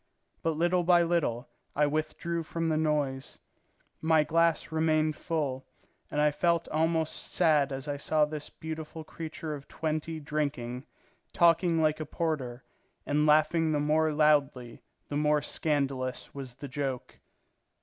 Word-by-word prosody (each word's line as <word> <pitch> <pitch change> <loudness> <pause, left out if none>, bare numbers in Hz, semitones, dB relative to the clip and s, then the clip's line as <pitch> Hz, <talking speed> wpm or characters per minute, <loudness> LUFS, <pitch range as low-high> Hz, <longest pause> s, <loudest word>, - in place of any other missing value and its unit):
But 165 -2 -1
little 175 +2 +2
by 175 0 +5
little 160 -8 0 0.3
I 150 - +3
withdrew 155 +3 -2
from 165 +1 -2
the 155 - +1
noise; 150 -4 -1 0.6
my 160 -1 +4
glass 165 +1 +1
remained 155 -1 +2
full, 145 -6 -2 0.5
and 150 - -2
I 150 0 +4
felt 170 +2 +1
almost 160 0 +1 0.2
sad 150 -5 +3
as 135 +1 -5
I 145 -1 -2
saw 150 +2 +2
this 150 0 -6
beautiful 160 0 -7
creature 160 0 -6
of 140 -2 -8
twenty 155 0 -3
drinking, 140 -4 -3 0.5
talking 170 -1 +4
like 155 0 +2
a 155 - -5
porter, 140 -7 -3 0.4
and 150 +1 +1
laughing 155 +2 +4
the 150 - +1
more 155 +2 +2
loudly 145 -5 +2 0.3
the 145 - -3
more 150 -1 +2
scandalous 135 -5 -2
was 130 -3 -7
the 140 +2 -8
joke. 135 -2 -4
155 Hz, 140 wpm, -29 LUFS, 145-160 Hz, 0.6 s, by